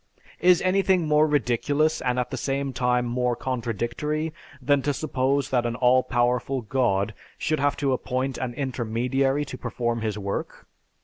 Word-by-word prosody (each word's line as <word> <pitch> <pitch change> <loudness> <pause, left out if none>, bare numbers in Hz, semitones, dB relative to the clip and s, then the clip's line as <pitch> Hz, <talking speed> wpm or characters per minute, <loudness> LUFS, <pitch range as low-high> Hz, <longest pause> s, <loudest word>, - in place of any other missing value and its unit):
Is 180 -1 +5
anything 185 -2 +2
more 150 +1 +4
ridiculous 145 +3 +1
and 125 0 0
at 125 - -1
the - - -2
same 135 +1 -2
time 125 0 +1
more 125 0 0
contradictory, 125 +6 -2 0.3
than 140 +1 +2
to 145 +1 -1
suppose 140 -1 0
that 125 -2 +2
an 115 - -3
all 125 +1 +4
powerful 125 +2 0
god 110 -3 0 0.2
should 155 0 -1
have 145 +1 +1
to 140 -2 +1
appoint 130 +1 -2
an 125 -2 -3
intermediary 130 +2 0
to 130 -2 -8
perform 120 -1 -2
his 110 -2 -2
work? 100 -1 -4
130 Hz, 160 wpm, -25 LUFS, 120-145 Hz, 0.3 s, Is